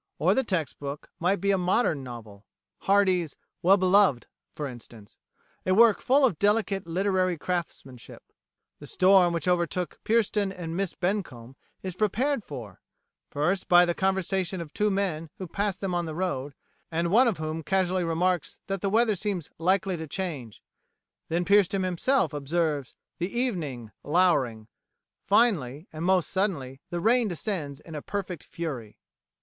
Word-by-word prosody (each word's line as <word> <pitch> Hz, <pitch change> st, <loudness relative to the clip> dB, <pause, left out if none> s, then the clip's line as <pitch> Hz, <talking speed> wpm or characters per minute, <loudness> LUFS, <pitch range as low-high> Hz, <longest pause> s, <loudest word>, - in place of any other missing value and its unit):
Or -, -, +3 dB
the 265 Hz, -, +2 dB
text 175 Hz, -, -2 dB
book 140 Hz, 0 st, -6 dB
might 180 Hz, +4 st, +2 dB
be 200 Hz, 0 st, +1 dB
a 195 Hz, -, +2 dB
modern 180 Hz, -, +1 dB
novel 110 Hz, -5 st, -10 dB, 0.4 s
Hardy's 185 Hz, -5 st, +3 dB, 0.3 s
"Well 190 Hz, +3 st, +5 dB
Beloved" 185 Hz, -8 st, +4 dB, 0.3 s
for 150 Hz, -, -4 dB
instance 115 Hz, -4 st, -12 dB, 0.4 s
a 185 Hz, -, +2 dB
work 225 Hz, -1 st, +5 dB
full 275 Hz, +2 st, +4 dB
of 190 Hz, -12 st, 0 dB
delicate 205 Hz, -3 st, +1 dB
literary 185 Hz, 0 st, +1 dB
craftsmanship. 155 Hz, -8 st, -5 dB, 0.6 s
The -, -, -10 dB
storm 185 Hz, -1 st, +5 dB
which 170 Hz, +1 st, -2 dB
overtook 180 Hz, 0 st, 0 dB
Pierston 210 Hz, -3 st, +1 dB
and 170 Hz, -3 st, -6 dB
Miss 195 Hz, -1 st, -2 dB
Bencomb 170 Hz, -, -3 dB, 0.3 s
is 185 Hz, -1 st, -4 dB
prepared 220 Hz, +7 st, 0 dB
for 120 Hz, -, -9 dB, 0.5 s
first 175 Hz, +7 st, -1 dB
by 175 Hz, 0 st, +7 dB
the 175 Hz, -, 0 dB
conversation 190 Hz, 0 st, 0 dB
of 160 Hz, -3 st, -8 dB
two 210 Hz, 0 st, +1 dB
men 185 Hz, -5 st, -1 dB
who 190 Hz, -, -5 dB
pass 200 Hz, +2 st, -2 dB
them 195 Hz, -2 st, -3 dB
on 175 Hz, -1 st, -1 dB
the 155 Hz, -, -5 dB
road, 145 Hz, -6 st, -3 dB, 0.3 s
and 170 Hz, +1 st, -1 dB
one 240 Hz, +5 st, +6 dB
of 225 Hz, -, 0 dB
whom 155 Hz, +1 st, -4 dB
casually 185 Hz, +3 st, +1 dB
remarks 175 Hz, +1 st, 0 dB
that 195 Hz, -1 st, -3 dB
the 200 Hz, -, 0 dB
weather 220 Hz, +1 st, +3 dB
seems 190 Hz, -4 st, -3 dB
likely 185 Hz, +1 st, +1 dB
to 160 Hz, 0 st, -6 dB
change; 145 Hz, -, -5 dB, 0.7 s
then 175 Hz, +2 st, 0 dB
Pierston 200 Hz, 0 st, +3 dB
himself 185 Hz, -, +1 dB
observes 150 Hz, -1 st, -1 dB, 0.2 s
"the 175 Hz, +2 st, -1 dB
evening 160 Hz, -, -3 dB
louring"; 140 Hz, -10 st, +2 dB, 0.6 s
finally, 185 Hz, -, +2 dB
and 155 Hz, +1 st, -5 dB
most 180 Hz, -5 st, +2 dB
suddenly, 140 Hz, -10 st, -2 dB
the 175 Hz, -, -3 dB
rain 230 Hz, +5 st, +3 dB
descends 165 Hz, -6 st, -4 dB
in 155 Hz, -3 st, -7 dB
perfect 185 Hz, -4 st, -4 dB
fury. 135 Hz, -11 st, -6 dB
180 Hz, 155 wpm, -27 LUFS, 155-195 Hz, 0.7 s, by